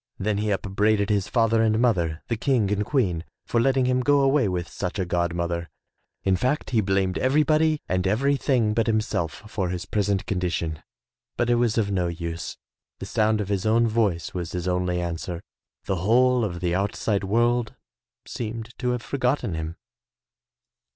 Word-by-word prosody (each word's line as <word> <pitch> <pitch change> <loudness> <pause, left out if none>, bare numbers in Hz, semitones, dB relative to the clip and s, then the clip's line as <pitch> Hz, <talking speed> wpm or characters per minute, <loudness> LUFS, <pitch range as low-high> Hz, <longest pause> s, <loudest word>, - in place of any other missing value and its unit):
Then 105 +1 -1
he 105 0 -1
upbraided 100 +1 +1
his 100 -1 +1
father 115 0 +2
and 110 -1 +3
mother, 85 -10 +1
the 115 - 0
King 115 -3 +1
and 105 0 +1
Queen, 100 - 0 0.2
for 115 - +1
letting 130 +1 +2
him 125 0 +2
go 145 +2 +3
away 135 -3 +3
with 90 -2 -2
such 95 +2 -4
a 95 - 0
god 85 -1 0
mother. 85 0 -2 0.5
In 95 -1 +3
fact, 130 +11 -1
he 115 -3 +3
blamed 95 -1 0
everybody 155 +3 +2
and 90 0 0
everything 130 0 +2
but 115 +1 +1
himself 110 -7 -1
for 95 -4 -2
his 90 +1 -4
present 100 -1 0
condition, 85 -4 -2 0.6
but 120 0 +1
it - - +4
was 120 -2 +1
of 100 -3 +1
no 90 -3 +1
use. 85 -1 -5 0.4
The - - -7
sound 110 0 +1
of 100 - -4
his 100 +1 0
own 115 +2 +4
voice 105 -7 0
was 85 -2 -4
his 90 0 -3
only 90 0 0
answer. 85 0 -4 0.4
The 95 - -1
whole 120 +6 +3
of 85 -5 -3
the 90 -1 0
outside 100 +2 0
world 120 +3 +1 0.5
seemed 115 +1 -5
to 125 - 0
have 120 -2 -4
forgotten 125 - -1
him. 80 +1 -4
105 Hz, 175 wpm, -25 LUFS, 90-120 Hz, 0.6 s, it